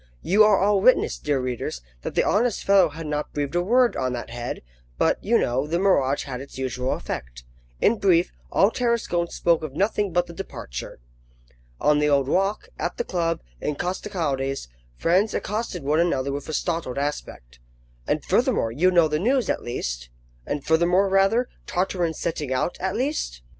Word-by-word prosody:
You 205 +4 +5
are 210 -2 +5
all 200 0 +3
witness, 255 +5 +3
dear 145 -2 0
readers, 125 - -3 0.2
that - - -5
the - - +3
honest 230 +1 +1
fellow 195 -4 +5
had 160 +2 -8
not 150 0 -3
breathed 145 0 -2
a 175 - +2
word 240 +6 +3
on 130 -1 -1
that 120 -1 -6
head; 120 - -5 0.3
but, - - +1
you - - +3
know, 130 +4 0
the 165 +3 0
mirage 145 -8 +2
had 130 -2 -6
its 140 - -11
usual 130 -1 -2
effect. - - -6 0.4
In 225 0 +3
brief, 180 -3 +3 0.2
all 200 +3 +4
Tarascon 235 -9 0
spoke 170 -1 +1
of 155 -4 -6
nothing 200 +1 0
but 175 +1 +2
the 170 - -11
departure. 65 - -7 0.8
On 150 0 +3
the 150 0 +2
Old 140 -2 +3
Walk, 195 - 0
at - - -2
the 480 - 0
club, 165 - -1 0.2
in 150 - -2
Costecalde's, 145 - -2 0.3
friends 185 - +2
accosted 210 -5 -3
one 150 +3 +2
another 140 -6 +1
with 140 +2 -5
a - - -3
startled 165 -7 -2
aspect: 100 - -5 0.5
"And - - -1
furthermore, 115 - +2
you 165 +10 +3
know 170 -3 +4
the 150 0 -1
news, 250 - +2
at - - -3
least?" - - -4 0.4
"And 145 - -3
furthermore, 175 +4 +3
rather? 195 +6 +3 0.2
Tartarin's 175 -3 -1
setting 150 -5 -3
out, 130 +6 0
at 190 +1 -2
least?" 245 - -2
165 Hz, 180 wpm, -24 LUFS, 135-195 Hz, 0.8 s, You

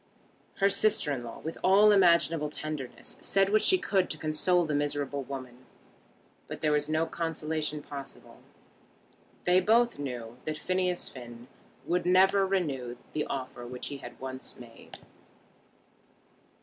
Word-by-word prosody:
Her 200 0 +3
sister 210 -8 +2
in 125 -3 -4
law 115 - -8
with 160 - -6
all 200 +3 +6
imaginable 170 -5 +4
tenderness 155 - -7
said 195 0 +2
what 215 0 +4
she 375 - +5
could 195 - +1
to 155 - -3
console 165 +3 +2
the 155 - -2
miserable 145 -1 -1
woman; 130 -2 -8 0.8
but - - -7
there 155 - +2
was 150 0 +1
no 155 +1 +2
consolation 155 -2 -3
possible. 140 -1 -10 1.0
They 180 +1 +5
both 230 0 +3
knew 120 -4 -5
that 155 0 -3
Phineas 185 +1 0
Finn 120 -1 -10 0.4
would 180 +1 0
never 190 +2 +5
renew 135 -11 -2 0.2
the 150 - -1
offer 130 -2 -5
which 125 0 -5
he 140 - -5
had 120 -3 -11
once 130 0 -7
made. 120 -2 -13
155 Hz, 140 wpm, -29 LUFS, 135-185 Hz, 1.0 s, all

